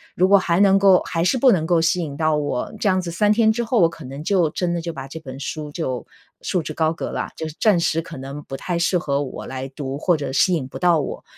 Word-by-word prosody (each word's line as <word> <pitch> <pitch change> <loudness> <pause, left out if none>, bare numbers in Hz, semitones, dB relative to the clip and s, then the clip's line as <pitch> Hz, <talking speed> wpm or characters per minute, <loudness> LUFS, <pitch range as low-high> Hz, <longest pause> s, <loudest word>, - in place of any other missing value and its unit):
如 185 - +3
果 200 +1 +6
还 180 -2 +1
能 195 -1 +5
够 195 -2 +5
还 165 -1 -1
是 220 +9 +2
不 255 0 +5
能 165 -4 0
够 170 0 +3
吸 170 +2 +1
引 145 -4 -5
到 155 -1 +2
我， 145 -4 -2
这 205 - +2
样 185 -1 +2
子 175 - -5
3 205 +5 +2
天 220 0 +4
之 235 +2 -1
后 235 0 +1
我 170 - +6
可 165 -1 -12
能 135 +3 -7
就 175 -2 +2
真 175 +2 -2
的 170 - -2
就 170 0 -4
把 135 -2 -7
这 160 +4 -8
本 135 -3 -9
书 150 +1 -5
就 130 -7 -4 0.4
束 180 - -1
之 155 - -5
高 160 0 +1
阁 - - -5
了， - - -3
就 160 - -4
是 155 - -9
暂 210 -6 +4
时 165 -1 +1
可 165 -1 -10
能 135 +2 -7
不 135 - -7
太 175 +3 -3
适 175 +2 +2
合 140 -5 -1
我 130 - -7
来 130 0 -5
读， 135 0 -5
或 175 +1 +2
者 140 -3 -4
吸 180 +7 +3
引 150 -7 -1
不 - - -9
到 175 -3 +3
我。 145 - -5
165 Hz, 300 characters per minute, -21 LUFS, 145-185 Hz, 0.4 s, 果